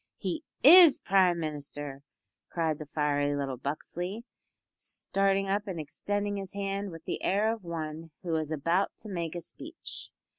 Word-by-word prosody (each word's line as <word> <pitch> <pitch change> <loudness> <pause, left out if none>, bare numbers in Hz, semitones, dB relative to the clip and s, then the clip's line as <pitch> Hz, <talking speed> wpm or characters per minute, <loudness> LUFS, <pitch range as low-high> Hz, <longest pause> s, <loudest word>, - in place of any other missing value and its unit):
"He 325 -1 -3 0.2
is 335 +1 +10
Prime 185 -3 +3
Minister," 145 -2 -5 0.5
cried 160 -3 -1
the 155 - -7
fiery 145 -1 +1
little 135 -2 -2
Buxley, 175 - -4 0.5
starting 195 0 0
up 205 +2 0
and 180 -4 -4
extending 205 +7 -2
his 195 0 -6
hand 200 0 -2
with 165 -2 -10
the - - -3
air 210 +4 +2
of 225 -3 -9
one 165 -1 -5
who 170 -2 -1
is 155 -1 -2
about 165 +6 0
to 215 - -8
make 170 -3 -3
a 175 - -3
speech. 325 - -8
175 Hz, 155 wpm, -29 LUFS, 155-200 Hz, 0.5 s, is